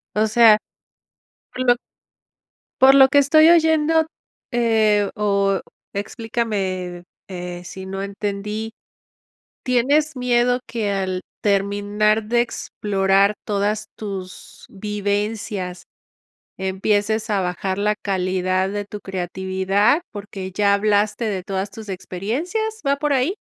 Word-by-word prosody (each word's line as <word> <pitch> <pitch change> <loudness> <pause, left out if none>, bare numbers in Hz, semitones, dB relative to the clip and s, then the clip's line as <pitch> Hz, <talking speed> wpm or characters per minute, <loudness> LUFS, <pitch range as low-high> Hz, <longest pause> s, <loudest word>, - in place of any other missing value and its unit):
O 215 +1 +3
sea, 220 -1 +6 1.0
lo 250 -1 +3 1.1
por 265 +1 +8
lo 270 -1 +8
que 285 - +4
estoy 310 +3 +6
oyendo, 320 -1 +4 0.5
eh, 220 -4 +2
o 200 -2 +1 0.3
explícame, 200 -5 -3 0.3
eh, 180 -1 -6
si 190 +1 -8
no 195 +1 -4
entendí, 210 +2 -4 0.9
¿tienes 280 +5 +2
miedo 245 0 +2
que 225 -3 -2
al 185 -2 -2 0.2
terminar 205 +2 +1
de 235 +2 +2
explorar 200 -3 +1
todas 210 +1 -1
tus 195 -3 -8
vivencias 205 -2 -3 0.8
empieces 205 +3 0
a 200 -2 +2
bajar 190 +1 -2
la 210 +1 +1
calidad 185 -1 -1
de 205 0 -3
tu 210 0 -8
creatividad, 190 - 0
porque 200 -2 -7
ya 200 0 +3
hablaste 210 +2 +1
de 190 -4 -3
todas 195 0 -3
tus 220 -3 -10
experiencias?, 300 - -3
¿va 280 0 +3
por 295 0 0
ahí? 275 +8 +1
205 Hz, 110 wpm, -21 LUFS, 195-235 Hz, 1.1 s, por